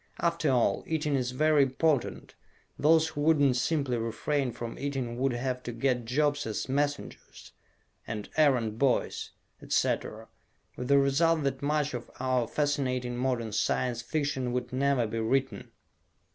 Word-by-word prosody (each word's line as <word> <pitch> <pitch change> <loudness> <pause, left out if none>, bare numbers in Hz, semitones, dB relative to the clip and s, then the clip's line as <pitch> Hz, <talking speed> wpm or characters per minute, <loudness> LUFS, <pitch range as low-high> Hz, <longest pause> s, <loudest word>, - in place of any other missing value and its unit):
After 170 -3 +1
all, 125 -3 +2
eating 155 -2 -1
is 130 -3 0
very 150 +3 +3
important; 135 +1 0 0.5
those 160 +1 +4
who 145 - -5
wouldn't 145 -4 +4
simply 135 -1 0
refrain 125 +4 -1
from 115 0 -7
eating 135 -4 -3
would 135 0 +1
have 125 +1 -2
to 120 - -5
get 120 0 0
jobs 145 +2 0
as 110 - -3
messengers, 145 +2 -3 0.6
and 105 -2 -5
errand 125 -8 +2
boys, 135 -3 0 0.3
etc. - - -1 0.5
with 125 - -5
the 140 +1 +5
result 150 +4 +3
that 135 -1 -1
much 150 0 0
of 120 -1 -6
our 130 -2 +1
fascinating 130 -4 -1
modern 120 -3 -1
Science 120 +3 0
Fiction 135 -1 -2
would 125 0 -3
never 135 -2 +2
be 115 +1 -3
written! 130 +4 -1
135 Hz, 145 wpm, -29 LUFS, 125-145 Hz, 0.6 s, the